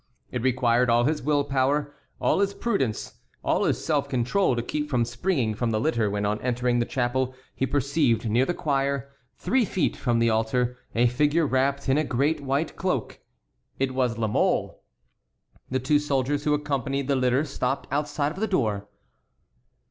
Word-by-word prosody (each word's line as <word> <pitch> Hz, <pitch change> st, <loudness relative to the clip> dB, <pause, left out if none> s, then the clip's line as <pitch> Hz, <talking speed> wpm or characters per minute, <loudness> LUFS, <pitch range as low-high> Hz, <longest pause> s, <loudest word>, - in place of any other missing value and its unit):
It 125 Hz, -, -2 dB
required 125 Hz, -1 st, +2 dB
all 120 Hz, 0 st, +4 dB
his 150 Hz, +4 st, 0 dB
will 145 Hz, +1 st, +2 dB
power, 140 Hz, +2 st, 0 dB, 0.3 s
all -, -, +2 dB
his 200 Hz, 0 st, +1 dB
prudence, 165 Hz, -, -2 dB, 0.2 s
all -, -, +1 dB
his -, -, 0 dB
self -, -, 0 dB
control 130 Hz, +5 st, +1 dB
to 120 Hz, -, -2 dB
keep 150 Hz, +3 st, -3 dB
from 125 Hz, -4 st, +1 dB
springing 120 Hz, -, -1 dB
from 120 Hz, +2 st, -1 dB
the 110 Hz, -1 st, 0 dB
litter 115 Hz, -5 st, +1 dB
when 100 Hz, 0 st, -1 dB
on 105 Hz, +1 st, -1 dB
entering 125 Hz, -1 st, 0 dB
the 120 Hz, -, 0 dB
chapel 130 Hz, 0 st, -1 dB, 0.2 s
he 135 Hz, -, -1 dB
perceived 140 Hz, -3 st, +1 dB
near 115 Hz, +4 st, +3 dB
the 175 Hz, +6 st, -1 dB
choir, 140 Hz, -2 st, -1 dB, 0.2 s
three 260 Hz, -1 st, +1 dB
feet 190 Hz, -5 st, 0 dB
from 120 Hz, -3 st, 0 dB
the 115 Hz, 0 st, +3 dB
altar, 125 Hz, +3 st, 0 dB, 0.2 s
a 120 Hz, +2 st, +4 dB
figure 150 Hz, +6 st, +2 dB
wrapped 140 Hz, +1 st, 0 dB
in 135 Hz, +3 st, +3 dB
a -, -, +2 dB
great 145 Hz, +3 st, 0 dB
white 140 Hz, +3 st, -1 dB
cloak. 180 Hz, -, -2 dB, 0.6 s
It 135 Hz, -1 st, -1 dB
was 125 Hz, -3 st, 0 dB
La 115 Hz, -, 0 dB
Mole. 105 Hz, -, 0 dB, 0.9 s
The 130 Hz, -, 0 dB
two 145 Hz, +3 st, +2 dB
soldiers 145 Hz, 0 st, -1 dB
who 150 Hz, -1 st, +3 dB
accompanied 140 Hz, -2 st, -2 dB
the 140 Hz, -, +2 dB
litter 130 Hz, +3 st, +2 dB
stopped 135 Hz, -2 st, -2 dB
outside 145 Hz, 0 st, 0 dB
of 175 Hz, -, -8 dB
the 220 Hz, -, 0 dB
door. 110 Hz, -, 0 dB
130 Hz, 180 wpm, -25 LUFS, 120-145 Hz, 0.9 s, all